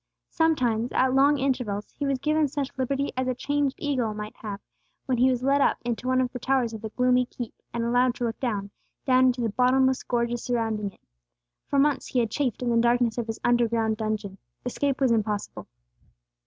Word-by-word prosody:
Sometimes, 250 -8 +1
at 260 0 +2
long 280 +2 +4
intervals, 250 -7 -2
he 285 - -2
was 275 -1 +1
given 305 +3 +1
such 280 -1 -4
liberty 275 +2 -1
as 255 0 -1
a 255 - 0
chained 285 +1 0
eagle 250 -7 -1
might 210 0 -6
have, 205 -2 -6 0.5
when 255 -3 0
he 255 +1 +5
was 250 -1 -1
led 280 +1 +3
up - - +3
into 240 +1 -3
one 255 0 +2
of 255 -1 0
the 250 - -5
towers 255 -2 +1
of 220 - -7
the 220 - -5
gloomy 250 +1 +2
keep, 240 -2 -7 0.2
and 235 - -2
allowed 245 +1 +2
to 245 - -5
look 230 -1 -2
down, 205 -6 -2 0.3
down 255 -1 +5
into 250 -1 +1
the 230 - 0
bottomless 260 +3 +3
gorges 240 -1 -1
surrounding 225 -4 -1
it. - - -27 0.7
For 280 - 0
months 280 0 +2
he 255 - 0
had 230 -3 0
chafed 255 -3 -1
in 240 - 0
the 230 - +2
darkness 235 0 +2
of 235 - -3
his 225 - -4
underground 230 -2 +2
dungeon; 215 -3 -3 0.3
escape 275 +2 -1
was 265 -3 +3
impossible. 210 -2 -2
245 Hz, 205 wpm, -26 LUFS, 225-265 Hz, 0.7 s, he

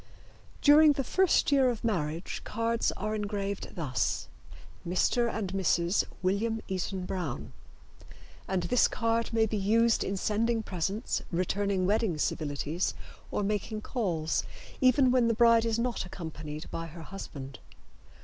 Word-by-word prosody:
During 300 +1 +7
the 275 - -2
first 370 +3 +2
year 270 -2 +5
of 235 -3 -4
marriage 170 -6 -2
cards 230 0 0
are 215 - -2
engraved 200 -2 -3
thus: 145 -7 -1 0.5
Mr. 230 +7 +1
and 195 -4 -3
Mrs. 180 -1 +2 0.2
William 220 +5 0
Eaton 185 0 -3
Brown 175 -9 -4 0.9
and 185 -2 0
this 235 +8 +4
card 230 0 0
may 225 -1 +3
be 215 0 -2
used 225 +3 +3
in 195 - -2
sending 225 +3 0
presents, 195 +3 -2
returning 185 +2 0
wedding 205 -3 +1
civilities 150 +3 -1 0.3
or - - -1
making 210 +1 -2
calls, 175 -11 -1 0.4
even 255 0 +5
when 250 -2 +3
the 230 - +2
bride 230 0 +5
is 225 -1 0
not 240 +1 -1
accompanied 155 -4 -7
by 165 0 -4
her 165 +1 -10
husband. 140 -7 -8
205 Hz, 135 wpm, -29 LUFS, 175-230 Hz, 0.9 s, During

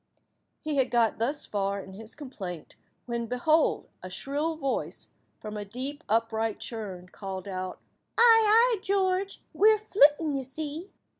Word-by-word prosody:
He 305 -2 -3
had 265 -2 +3
got 230 -3 +2
thus 270 +6 -1
far 200 -1 -1
in 190 0 -9
his 220 +3 -10
complaint 195 - -8 0.3
when, 235 -1 -3
behold! 305 +7 +2
a 185 - -7
shrill 290 - -2
voice, 275 -4 -3 0.3
from 215 0 -6
a 205 - -3
deep 260 +9 -6
upright 225 0 0
churn, 195 -6 -6
called 190 -1 -7
out— 185 -1 -5 0.4
"Ay, 450 -1 +7
ay, 455 +1 +5
George, 385 0 0
we 430 +2 +6
're 435 - +4
flitting, 310 -7 +4
you 270 -1 -2
see." 305 +7 -6
260 Hz, 150 wpm, -28 LUFS, 210-320 Hz, 0.4 s, Ay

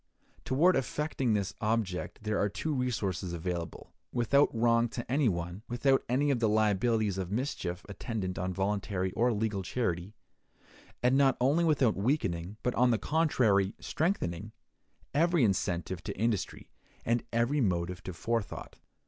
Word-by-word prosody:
Toward 165 +8 +4
effecting 135 -2 -1
this 100 -1 -1
object 105 -3 -2
there 110 -1 0
are 105 - +2
two 155 +9 -3
resources 100 -9 -2
available, 85 0 -5 0.2
without 135 +4 +3
wrong 115 0 +2
to 120 +1 -5
any 135 -2 +3
one, 85 +1 -4
without 135 +3 +2
any 140 +4 +2
of 130 - +1
the 115 -2 +2
liabilities 110 -1 +2
of 90 -2 -3
mischief 105 -6 -3
attendant 100 -2 -4
on 90 +1 -1
voluntary 95 0 -1
or 120 +6 +2
legal 105 -2 -1
charity, 95 -2 -2 0.9
and 125 +2 +4
not 135 -1 +4
only 140 +7 +3
without 140 -8 +3
weakening, 95 - -1
but 125 - +1
on 125 0 +3
the 115 - +3
contrary 110 -8 +2
strengthening, 110 - -2 0.6
every 165 0 +3
incentive 95 -4 0
to - - -5
industry, 110 -2 -2 0.3
and 120 0 +2
every 120 +5 +1
motive 90 -3 -1
to - - -6
forethought. 115 +5 -3
110 Hz, 145 wpm, -30 LUFS, 95-125 Hz, 0.9 s, Toward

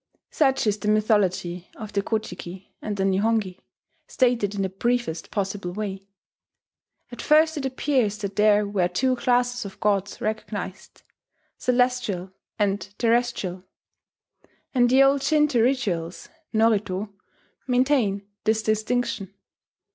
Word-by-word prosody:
Such 270 -5 +2
is 210 -1 +1
the 210 - -4
mythology 190 -5 +1
of 215 -1 -8
the 200 - +1
Ko 220 +2 0
ji 215 - -7
ki 185 +2 -10
and 210 -1 -4
the 195 - 0
Nihongi, 195 0 +1 0.5
stated 235 -6 +1
in 195 - -1
the 190 - -1
briefest 195 -4 -2
possible 195 -3 -3
way. 195 -1 -5 1.0
At 240 - -7
first 315 +1 +4
it 275 -3 -2
appears 255 -5 0
that 200 -2 -5
there 210 0 +4
were 195 -3 +1
two 255 +9 +1
classes 245 -1 +1
of 195 -1 -9
gods 200 -1 0
recognized: 210 -3 -5 0.6
Celestial 245 -7 0 0.3
and 205 -2 +1 0.2
Terrestrial; 230 -6 0 1.1
and 245 -2 +4
the 265 +2 +6
old 275 0 +3
Shinto 300 -5 +3
rituals 200 -10 -1 0.2
(norito) 210 -3 +1 0.5
maintain 245 -6 +1 0.2
this 220 0 +1
distinction. 215 -1 -1
215 Hz, 125 wpm, -24 LUFS, 195-245 Hz, 1.1 s, the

